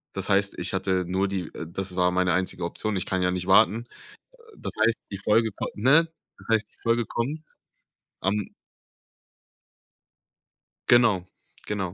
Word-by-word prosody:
Das 95 +1 -3
heißt, 100 0 +2
ich 90 +2 0
hatte 95 -1 0
nur 95 +2 0
die 95 -2 -3
äh, - - -5
das 95 +1 -4
war 90 0 +3
meine 90 -1 +2
einzige 90 -1 -1
Option, 110 +4 -3
ich 90 - -2
kann 95 -1 0
ja 90 - +2
nicht 90 0 -3
warten. 110 +4 +4 0.5
Äh, - - -22 0.2
das - - -5
heißt, 115 +1 +3
die 100 - -4
Folge 110 +3 +2
komm - - -3
ne? 135 +10 +4 0.3
Das - - -17
heißt 110 -2 +2
die - - -31
Folge 115 0 +2
kommt 140 +9 -3 0.8
am 100 +1 -1 2.4
Genau, 115 -7 +5 0.4
genau. 95 -4 -3
100 Hz, 160 wpm, -26 LUFS, 90-110 Hz, 2.4 s, Genau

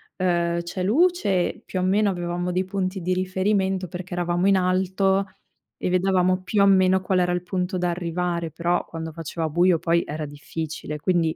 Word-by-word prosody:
ehm, 170 -2 0
c'è 180 +2 -4
luce 230 - +1
più 185 - -3
o - - 0
meno 200 +2 +2
avevamo 175 0 -3
dei 185 +1 0
punti 190 0 -3
di 180 +2 0
riferimento 190 0 0
perché 180 +1 -7
eravamo 175 +1 0
in 195 -1 +5
alto 190 +1 +1 0.5
e - - -3
vedevamo 185 0 +2
più 200 +2 +1
o 200 - +6
meno 190 -1 +4
qual 185 0 0
era 180 0 +2
il 180 - 0
punto 180 +1 -2
da 175 0 0
arrivare, 170 -1 -2
però 170 +3 0
quando 160 0 -6
faceva 165 0 -4
buio 175 +2 +3
poi 170 +1 +2
era 150 0 -4
difficile. 150 +1 -6
Quindi 170 -1 +1
180 Hz, 180 wpm, -24 LUFS, 170-190 Hz, 0.5 s, o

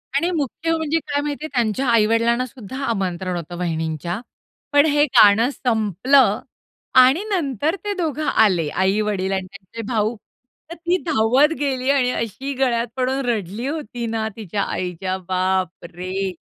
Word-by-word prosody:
आणि 340 - +2
मुख्य 300 +4 -2
म्हणजे 320 +1 0
काय 285 0 0
माहिती 295 +1 -4
आहे? 310 - -6
त्यांच्या 240 +1 0
आई-वडिलांना 230 +2 +3
सुद्धा 255 -1 -9
आमंत्रण 185 -4 -2
होतं 175 +1 -6
वहिणींच्या. 165 +1 -2 0.5
पण 290 +1 +5
हे 295 -1 +3
गाणं 225 -1 +5
संपलं 225 - +2 0.6
आणि 265 +9 +4
नंतर 310 - 0
ते 415 0 -1
दोघं 310 -3 -2
आले, 185 -8 +3
आई-वडील 190 +1 0
आणि 190 -1 -2
त्यांचे 200 +3 -9
भाऊ. 220 +1 +1 0.6
तर - - -5
ती 345 +2 0
धावत 270 +2 +3
गेली 265 -2 -1
आणि 255 -3 +2
अशी 230 +5 -3
गळ्यात 240 -3 +1
पडून 260 +1 0
रडली 220 0 -2
होती 245 -6 -4
ना, 220 -1 -2
तिच्या 205 -2 -3
आईच्या 185 +1 -3
बापरे! 185 0 -2
230 Hz, 140 wpm, -21 LUFS, 190-275 Hz, 0.6 s, पण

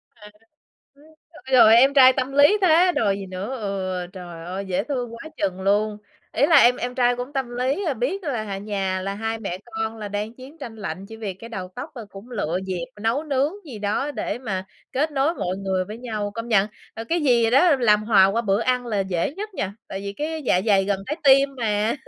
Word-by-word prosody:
À, 210 -2 -14 0.6
ơ, 285 - -22 0.3
ôi 305 - -15
trời 255 - +7
ơi, 220 +1 +8
em 270 +4 +5
trai 260 -2 +8
tâm 260 +1 -2
lý 290 +9 +5
thế 360 +1 +5
đòi 200 -8 +1
gì 195 - -7
nữa! 190 +8 -5
Ừ, 185 -3 -3
trời 175 -3 -9
ơi! 190 +3 -5
Dễ 185 +1 -1
thương 245 -3 -3
quá 315 +7 -9
chừng 190 -1 -2
luôn! 210 +2 +1 0.3
Ý - - +3
là 330 - +6
em 245 +1 +6
em 250 0 -4
trai 245 -1 +2
cũng 250 +3 -6
tâm 265 -3 -2
lý, 265 +10 0
ờ, 310 -6 0
biết 275 - -2
là, 245 -7 -2
à, 200 -2 -4
nhà 195 -2 -2
là 195 +1 -3
hai 225 +2 -3
mẹ 185 -4 -4
con 220 -1 -4
là 210 -2 -6
đang 205 +3 -4
chiến 265 +6 -13
tranh 235 -7 -8
lạnh, 195 -2 -6
chỉ 225 - -10
vì 210 -4 -5
cái 230 +5 -11
đầu 185 -5 -5
tóc 265 +6 -6
thôi, 235 -4 -7
và - - -20
cũng 200 +6 -12
lựa 180 -7 -2
dịp 180 -3 -3 0.2
nấu 230 +8 0
nướng 285 +2 0
gì 245 -7 -8
đó, 210 +8 -1
để 235 -5 -3
mà 195 -7 -4 0.3
kết 300 +4 0
nối 285 +4 +1
mọi 185 - -3
người 190 -1 -1
với 215 +4 -8
nhau. 215 -4 -4
Công 230 +1 -5
nhận, 205 -3 +4 0.3
là 225 - -5
cái 335 +9 0
gì 235 -4 +3
đó 290 +5 +5
làm 210 -2 +4
hòa 205 -4 +6
qua 205 +4 0
bữa 200 -1 +1
ăn 250 +1 0
là 210 -3 -1
dễ 190 - -1
nhất 420 +2 -7
nha? 200 - -3
Tại 195 - -5
vì 200 0 -5
cái 310 +7 -4
dạ 180 -9 +2
dày 195 -2 +4
gần 200 0 0
trái 300 - -2
tim 275 0 +6
mà. 215 -1 0
225 Hz, 240 wpm, -23 LUFS, 195-265 Hz, 0.6 s, ơi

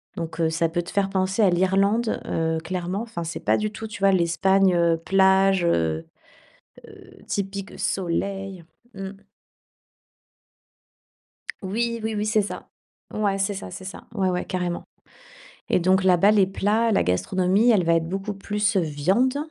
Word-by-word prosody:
Donc, 165 -3 -6
heu, 165 -1 +2
ça 165 +1 0
peut 175 +1 -2
te 170 - -9
faire 200 -1 0
penser 190 +2 0
à 200 - +5
l'Irlande, 195 +5 +1
heu, 160 0 -1
clairement. 180 +3 -3
Enfin 225 -7 -5
c'est 165 +1 -5
pas - - +3
du 215 0 -2
tout, 220 +2 -7
tu 215 - -9
vois, 195 0 +5
l'Espagne, 190 +2 +3
heu, 170 -1 +3
plage, 190 0 +3
heu 80 - 0 0.8
heu, - - -16
typique, 195 0 -4
soleil. 195 0 -3 0.3
Mmh. 195 -1 -6 2.5
Oui, 230 +4 -2
oui, 220 0 -2
oui, 210 - -1
c'est 215 0 +2
ça. 200 - -7 0.4
Ouais, 200 -2 0
c'est 195 +1 0
ça 140 - -7
c'est 190 - -9
ça, 190 - -9
ouais, 195 -3 +1
ouais, 180 0 -2
carrément. 180 -1 -3 0.9
Et - - +3
donc, 185 +2 +2
là-bas, 190 +2 +5
les 200 -3 +4
plats, 210 +4 +1
la 205 - +3
gastronomie, 185 - +2
elle 200 -5 +3
va 170 0 +3
être 165 -1 0
beaucoup 195 +3 -3
plus, 205 +2 -1
heu, - - +4
viande. 185 - +1
190 Hz, 165 wpm, -24 LUFS, 175-205 Hz, 2.5 s, à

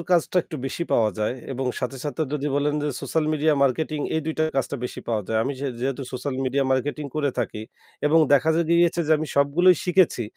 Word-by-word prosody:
এর - - -4
কাজটা 175 +1 +2
একটু 160 - -7
বেশি 135 - -3
পাওয়া 110 -2 +3
যায় 105 +3 0 0.2
এবং 135 0 -3
সাথে, 130 +1 -3
সাথে 150 +2 -2
যদি 150 -1 -2
বলেন 145 +1 +1
যে, 150 - 0
সোশ্যাল 160 -1 -1
মিডিয়া 155 0 +2
মার্কেটিং, 150 +3 0
এই 160 - +1
২ 160 - -2
টা 155 - +3
কাজটা 135 +1 -1
বেশি - - -5
পাওয়া 110 -3 0
যায়। 110 0 0
আমি 135 - -1
সে 140 - -2
যেহেতু 135 +1 -2
সোশ্যাল 130 +2 -3
মিডিয়া 135 +1 +1
মার্কেটিং 145 +3 -1
করে 145 -2 +1
থাকি 105 - -2 0.4
এবং 155 +2 +4
দেখা 145 +3 +4 0.2
গিয়েছে 170 0 +3
যে 160 - +3
আমি 155 - -3
সবগুলোই 160 +6 +5
শিখেছি। 180 -8 +3
145 Hz, 215 wpm, -24 LUFS, 130-160 Hz, 0.4 s, সবগুলোই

